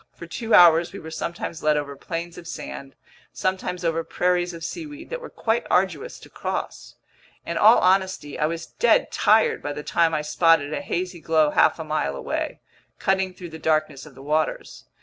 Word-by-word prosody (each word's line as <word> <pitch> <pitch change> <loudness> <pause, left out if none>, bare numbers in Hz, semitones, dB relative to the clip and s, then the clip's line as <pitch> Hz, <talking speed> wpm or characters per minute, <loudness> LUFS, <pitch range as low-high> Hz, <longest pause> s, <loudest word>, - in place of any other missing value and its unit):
For 170 - -9
two 225 +7 0
hours 170 -1 +6
we 200 - -8
were 160 - -9
sometimes 170 0 -5
led 150 -1 +2
over 140 -1 -4
plains 170 +4 -6
of 170 - -12
sand, 135 -3 -8 0.4
sometimes 180 -1 -2
over 165 0 0
prairies 180 0 0
of 165 -1 -9
seaweed 305 - -7
that - - -4
were 485 - -8
quite 230 +1 -1
arduous 180 -5 0
to - - -13
cross. - - -5 0.5
In - - -4
all - - +7
honesty, 190 -5 +1
I 150 - +2
was 165 +1 -4
dead 235 - +2
tired 220 +1 +3
by 145 - -4
the 150 - -7
time 165 0 +2
I 150 - -1
spotted 160 -2 +3
a - - -2
hazy 180 0 -3
glow 155 -2 +2
half - - +4
a - - -5
mile 70 0 -2
away, - - -4 0.4
cutting 190 -1 0
through 175 -2 -9
the 160 0 -10
darkness 155 -2 0
of 140 - -15
the 135 - -12
waters. 155 - -2
165 Hz, 190 wpm, -24 LUFS, 155-185 Hz, 0.5 s, all